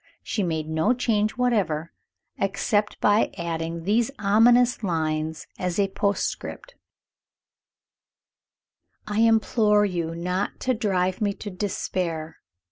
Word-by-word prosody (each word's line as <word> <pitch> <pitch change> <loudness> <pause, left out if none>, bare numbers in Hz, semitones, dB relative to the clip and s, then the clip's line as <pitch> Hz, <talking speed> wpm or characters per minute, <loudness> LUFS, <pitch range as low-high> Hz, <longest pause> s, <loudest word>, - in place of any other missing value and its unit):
She 210 - -2
made 160 -4 -1
no 160 +10 +1
change 215 -3 0
whatever, 195 -11 0 0.5
except 205 +2 0
by 210 +2 +3
adding 165 0 -3
these 220 +6 +2
ominous 235 +5 +4
lines 160 -4 -2
as 180 -1 -2
a 200 -1 +2
postscript: 205 - -2 2.3
"I 210 0 -2
implore 220 -2 +4
you 170 -4 -2
not 180 +3 -2
to 255 - +1
drive 190 -5 0
me 205 -1 +1
to 205 - -7
despair. 175 -4 -3
200 Hz, 110 wpm, -25 LUFS, 170-215 Hz, 2.3 s, ominous